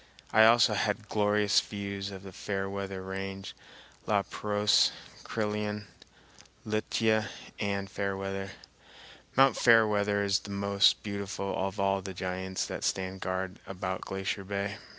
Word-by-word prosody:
I 110 Hz, 0 st, +8 dB
also 115 Hz, -1 st, +6 dB
had 105 Hz, +1 st, -1 dB
glorious 105 Hz, -1 st, +3 dB
views 100 Hz, -1 st, -5 dB
of 95 Hz, -1 st, -9 dB
the 95 Hz, -, -9 dB
Fairweather 95 Hz, 0 st, -4 dB
Range, 95 Hz, 0 st, -5 dB, 0.5 s
La -, -, +3 dB
Pérouse, 105 Hz, 0 st, +3 dB, 0.3 s
Crillon, 105 Hz, -1 st, -2 dB, 0.8 s
Lituya, 110 Hz, 0 st, +1 dB, 0.3 s
and 100 Hz, -1 st, -1 dB
Fairweather. 95 Hz, -1 st, -3 dB, 0.9 s
Mt. 135 Hz, 0 st, +6 dB
Fairweather 105 Hz, -3 st, +4 dB
is 100 Hz, 0 st, +2 dB
the 100 Hz, -, -11 dB
most 100 Hz, 0 st, +3 dB
beautiful 100 Hz, -1 st, -3 dB
of 95 Hz, +1 st, -2 dB
all 100 Hz, 0 st, +2 dB
the 95 Hz, 0 st, -7 dB
giants 95 Hz, +1 st, -3 dB
that -, -, -5 dB
stand 95 Hz, 0 st, -1 dB
guard 95 Hz, +1 st, -3 dB
about 95 Hz, -1 st, -4 dB
Glacier 95 Hz, +1 st, -3 dB
Bay. 100 Hz, +1 st, -3 dB
100 Hz, 125 wpm, -30 LUFS, 95-105 Hz, 0.9 s, I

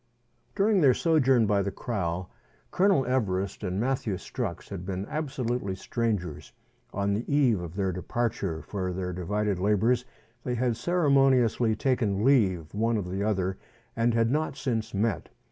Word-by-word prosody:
During 200 Hz, -1 st, +3 dB
their 130 Hz, -5 st, +5 dB
sojourn 135 Hz, -8 st, +3 dB
by 100 Hz, -1 st, +2 dB
the 100 Hz, -, -1 dB
kraal, 90 Hz, -5 st, -3 dB, 0.4 s
Colonel 185 Hz, -8 st, +3 dB
Everest 100 Hz, -6 st, -1 dB
and 95 Hz, 0 st, -2 dB
Matthew 120 Hz, -4 st, 0 dB
Strux 100 Hz, 0 st, -5 dB
had 95 Hz, -3 st, -6 dB
been 95 Hz, +1 st, -4 dB
absolutely 125 Hz, -9 st, -2 dB
strangers. 95 Hz, -, -3 dB, 0.4 s
On 100 Hz, 0 st, 0 dB
the 110 Hz, +7 st, -3 dB
eve 130 Hz, -9 st, +3 dB
of 85 Hz, 0 st, -7 dB
their 95 Hz, -2 st, 0 dB
departure 90 Hz, -3 st, -2 dB
for 95 Hz, +2 st, -3 dB
their 90 Hz, 0 st, -3 dB
divided 100 Hz, +2 st, -1 dB
labours, 110 Hz, +5 st, +2 dB, 0.4 s
they 125 Hz, -, -2 dB
had 120 Hz, -1 st, 0 dB
ceremoniously 135 Hz, -8 st, +3 dB
taken 110 Hz, -4 st, 0 dB
leave 95 Hz, -, +2 dB
one 115 Hz, +2 st, +1 dB
of 90 Hz, -3 st, -4 dB
the 95 Hz, +1 st, -2 dB
other, 95 Hz, -3 st, -1 dB, 0.4 s
and 115 Hz, 0 st, +1 dB
had 115 Hz, 0 st, +2 dB
not 155 Hz, +2 st, -1 dB
since 110 Hz, -4 st, -2 dB
met. 105 Hz, -2 st, -1 dB
110 Hz, 150 wpm, -27 LUFS, 95-125 Hz, 0.4 s, their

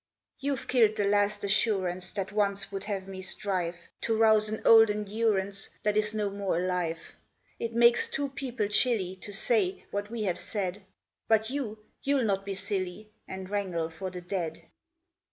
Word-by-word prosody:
"You've 275 Hz, -2 st, -2 dB
killed 225 Hz, -4 st, +4 dB
the 205 Hz, -, +1 dB
last 205 Hz, +1 st, +2 dB
assurance 195 Hz, -3 st, +1 dB
That 195 Hz, -1 st, -3 dB
once 200 Hz, -1 st, 0 dB
would 195 Hz, 0 st, -4 dB
have 195 Hz, -3 st, -3 dB
me 190 Hz, -1 st, -7 dB
strive 185 Hz, -3 st, -3 dB
To 225 Hz, -1 st, 0 dB
rouse 220 Hz, -1 st, +5 dB
an 215 Hz, -, -3 dB
old 225 Hz, -1 st, +8 dB
endurance 205 Hz, -2 st, -1 dB
That 210 Hz, 0 st, +1 dB
is 215 Hz, 0 st, +1 dB
no 210 Hz, -2 st, 0 dB
more 200 Hz, -3 st, -1 dB
alive. 180 Hz, -2 st, -2 dB, 0.5 s
It 230 Hz, 0 st, -3 dB
makes 235 Hz, 0 st, +5 dB
two 280 Hz, 0 st, -2 dB
people 260 Hz, -5 st, -3 dB
chilly 210 Hz, -4 st, +2 dB
To 205 Hz, -, -6 dB
say 385 Hz, -, +1 dB
what 205 Hz, +1 st, -3 dB
we 230 Hz, -1 st, -3 dB
have 180 Hz, -4 st, 0 dB
said, 195 Hz, -1 st, -3 dB, 0.4 s
But 220 Hz, +1 st, +3 dB
you 220 Hz, -6 st, -4 dB, 0.2 s
you'll 275 Hz, -2 st, +2 dB
not 195 Hz, -3 st, 0 dB
be 200 Hz, -1 st, -3 dB
silly 195 Hz, +1 st, -3 dB, 0.2 s
And 190 Hz, 0 st, -6 dB
wrangle 185 Hz, -5 st, -2 dB
for 175 Hz, +4 st, -5 dB
the 180 Hz, -1 st, -7 dB
dead. 175 Hz, -3 st, -4 dB
205 Hz, 170 wpm, -29 LUFS, 190-220 Hz, 0.5 s, old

